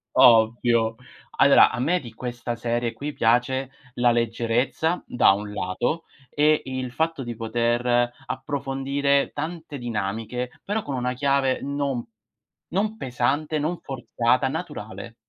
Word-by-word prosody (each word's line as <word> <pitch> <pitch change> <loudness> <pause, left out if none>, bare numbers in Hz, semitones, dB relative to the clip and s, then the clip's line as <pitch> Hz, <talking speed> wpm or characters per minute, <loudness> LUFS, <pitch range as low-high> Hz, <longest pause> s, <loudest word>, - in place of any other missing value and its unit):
Ovvio. 115 0 +5 0.4
Allora - - +7
a - - -4
me 165 +8 +2
di 120 -4 -10
questa 120 0 -4
serie 120 0 -1
qui 145 +6 -5
piace 125 +3 +1 0.2
la 120 0 +4
leggerezza, 120 +8 0
da 125 - +5
un 105 +1 -3
lato, 120 - -2 0.3
e 150 +1 +3
il 130 -1 -4
fatto 160 +1 -1
di 120 -1 -4
poter 120 +2 +1
approfondire 140 +1 0
tante 160 0 -5
dinamiche, 115 +1 -3
però 210 +2 -1
con 140 - -4
una 125 0 -1
chiave 135 0 +1
non 140 -3 -2 0.7
non 210 +4 0
pesante, 135 - -1
non 160 +4 -1
forzata, 130 -1 0
naturale. 130 -7 -6
125 Hz, 125 wpm, -24 LUFS, 120-140 Hz, 0.7 s, Allora